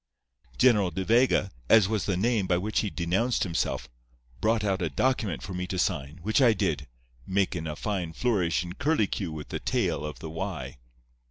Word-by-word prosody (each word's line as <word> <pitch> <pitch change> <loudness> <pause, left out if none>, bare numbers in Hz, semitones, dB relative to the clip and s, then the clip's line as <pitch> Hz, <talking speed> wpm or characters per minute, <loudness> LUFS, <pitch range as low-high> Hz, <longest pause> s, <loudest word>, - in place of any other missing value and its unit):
"General 105 -7 +4
De 95 +3 -4
Vega, 115 -3 +3 0.2
as 110 -4 +7
was 110 -2 -1
the 95 -3 +1
name 105 -1 +1
by 90 -1 +2
which 105 +4 0
he 105 - -1
denounced 95 +8 0
himself, 85 -3 -1 0.5
brought 110 - +1
out 100 -2 0
a 85 - 0
document 110 - 0
for 95 - -6
me 90 0 -3
to 95 -1 -3
sign, 75 -3 -1
which 110 +7 +2
I 120 -4 +6
did, 80 -10 -1 0.4
makin' 95 -4 0
a 75 - -4
fine 90 -2 -3
flourish 85 - +1
and 90 0 -9
curlycue 110 - +1
with 75 -1 -7
the - - -3
tail - - 0
of 75 0 -5
the 80 - -7
'y. 80 -7 -5
95 Hz, 185 wpm, -27 LUFS, 85-110 Hz, 0.5 s, as